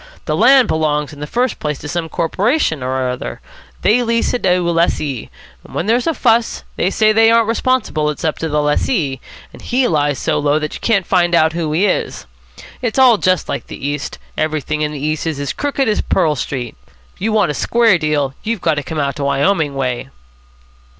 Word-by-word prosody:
The - - -1
land 265 -3 +5
belongs 150 -1 0
in 145 - -12
the 150 - -5
first 245 +5 -1
place 150 -2 -2
to 145 - -8
some 165 +1 -3
corporation 185 - 0
or 130 0 -1
other. 125 0 -5 0.4
They 225 +5 +4
lease 230 -1 0
it 245 - -1
to 190 - +2
a - - +1
lessee. 150 -7 -1 0.3
When - - -5
there's 235 +6 +1
a 325 - +1
fuss, 230 -2 +1
they 180 - +1
say 215 +2 +3
they 225 +1 +5
aren't 230 -1 +4
responsible, 230 -10 0
it's 150 +3 -4
up 155 - -1
to 160 - -2
the 150 0 +1
lessee. 150 - 0 0.3
And - - -13
he 250 +1 +1
lies 145 -3 +1
so - - 0
low 145 0 +2
that 155 -1 -3
you - - -7
can't 200 -6 +1
find 175 -2 +2
out 160 -1 +3
who 165 -2 -2
he 170 +7 +2
is. - - -1 0.6
It's 240 -2 -2
all 250 -5 +6
just 185 -1 +1
like - - -4
the 140 - -6
East. 145 -1 -4 0.2
Everything 155 -1 -1
in 150 0 0
the 150 - -6
East 155 +3 -2
is 155 -3 -2
as 140 -2 -3
crooked 280 -1 -1
as 215 - +1
Pearl 155 -2 +1
Street. 125 -3 -4 0.4
If - - -27
you 220 +3 0
want 210 -8 +2
a - - -3
square 225 - +3
deal, 150 -3 0
you've 225 -1 -2
got 160 -3 0
to - - 0
come 160 - -6
out 140 0 -2
Wyoming 145 +2 +1
way." 130 -1 -2
160 Hz, 210 wpm, -17 LUFS, 145-220 Hz, 0.6 s, all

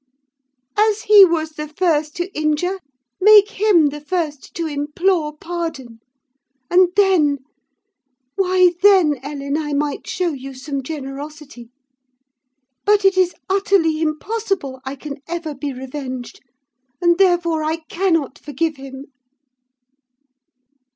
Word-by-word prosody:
As 430 0 +2
he 415 -1 +8
was 325 -3 +1
the 300 0 -6
first 305 -1 0
to 350 +3 -4
injure, 310 +5 -1 0.4
make 420 +1 +7
him 380 -8 +3
the 295 +1 -8
first 300 -3 -4
to 335 - -2
implore 300 +2 -1
pardon; 315 -9 -6 0.7
and 360 0 +5
then—why 305 0 0
then, 370 -9 +5
Ellen, 280 0 -4
I 295 -2 -3
might 290 +3 -2
show 370 -2 -1
you 270 0 -8
some 275 +1 -5
generosity. 280 -2 -8 1.1
But 415 -1 +3
it 390 -1 +5
is 370 -1 +2
utterly 380 -5 +1
impossible 320 - -2
I 265 +1 -5
can 280 +1 -8
ever 335 -2 -4
be 285 +1 -5
revenged, 260 -1 -7 0.6
and 345 0 +2
therefore 345 -4 +2
I 310 +1 0
cannot 330 -7 -1
forgive 300 +1 -3
him. 270 0 -9
310 Hz, 115 wpm, -19 LUFS, 285-365 Hz, 1.1 s, he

